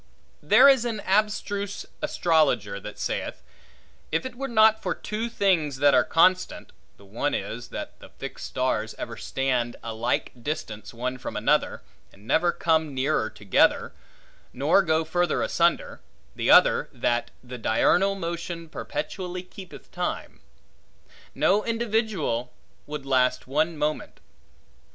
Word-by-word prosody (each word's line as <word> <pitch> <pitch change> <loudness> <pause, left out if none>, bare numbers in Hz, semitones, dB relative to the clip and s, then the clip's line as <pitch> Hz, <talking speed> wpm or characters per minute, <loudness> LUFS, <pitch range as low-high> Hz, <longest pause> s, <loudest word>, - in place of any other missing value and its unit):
There - - +6
is 265 -4 +5
an 230 -3 -3
abstruse 205 0 -1 0.2
astrologer 130 - +1
that 105 +1 -9
saith, - - -4 0.7
If 160 - 0
it 260 - -5
were 270 +3 -5
not 220 -2 +4
for - - -2
two 220 +2 -4
things 180 - +1
that 145 +1 +4
are 125 - +5
constant 185 +3 +2 0.3
(the 100 - -17
one 115 +9 -2
is, 115 +5 -5
that - - -7
the - - -13
fixed - - -8
stars 115 -4 -1
ever - - -6
stand 125 -3 -1
a 115 - -5
like 115 +3 -1
distance 110 -7 -5
one 125 +2 -4
from - - -5
another, - - +1 0.3
and 100 +2 -19
never 175 +8 +2
come 160 -4 0
nearer 130 -4 0
together, 105 -3 +2 0.6
nor 145 +9 +3
go 160 -3 +1
further 175 +2 0
asunder; 170 0 0 0.3
the - - -1
other, - - +6
that 120 0 -1
the 125 0 -8
diurnal 190 - +2
motion 170 -2 -5
perpetually 180 - -5
keepeth 185 0 -12
time), - - -4 1.0
no 190 +9 +3
individual 220 - -1 0.4
would 150 -2 -6
last 125 -1 +2
one 155 +4 0
moment. 150 +1 -3
160 Hz, 135 wpm, -25 LUFS, 125-195 Hz, 1.0 s, There